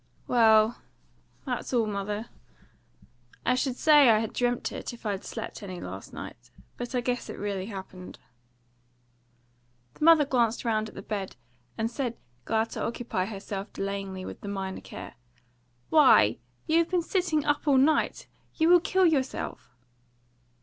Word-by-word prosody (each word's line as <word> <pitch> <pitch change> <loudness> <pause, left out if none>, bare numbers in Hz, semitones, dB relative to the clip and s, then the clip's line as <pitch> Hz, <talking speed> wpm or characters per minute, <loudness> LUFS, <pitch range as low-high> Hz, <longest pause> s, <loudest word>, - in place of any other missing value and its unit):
"Well, 220 -1 +4 0.6
that's 255 -1 -3
all, 230 -2 +3
mother. 210 +2 -4 1.2
I 250 - +3
should 255 0 0
say 295 -2 +6
I 220 - +6
had 220 0 -2
dreamt, 245 -1 0
it, - - -6
if 235 - -14
I 210 - +1
had 195 -1 -4
slept 225 - -6
any 185 -3 -7
last - - -8
night; - - -9 0.3
but 245 +1 -5
I 250 - +1
guess 245 0 -2
it - - -6
really 200 -2 -3
happened." 190 -3 -9 1.8
The - - -7
mother 320 -2 +7
glanced 240 -3 +1
round 220 -1 0
at - - -17
the 195 - -8
bed, 195 -3 -4 0.4
and 225 +1 -1
said, 245 -2 -3 0.3
glad 225 0 0
to - - -5
occupy 230 -5 -2
herself 200 0 -6
delayingly 195 -1 -4
with - - -8
the - - -8
minor 195 -1 -4
care: - - -9 0.8
"Why, 255 - +6 0.3
you 320 +1 +3
have 335 - +1
been 360 -2 +1
sitting 335 -5 0
up 295 +1 0
all 280 -2 +5
night! 295 +4 +2 0.3
You 320 0 +3
will 355 0 +8
kill 375 +1 +2
yourself." 280 -6 -1
230 Hz, 155 wpm, -27 LUFS, 200-275 Hz, 1.8 s, will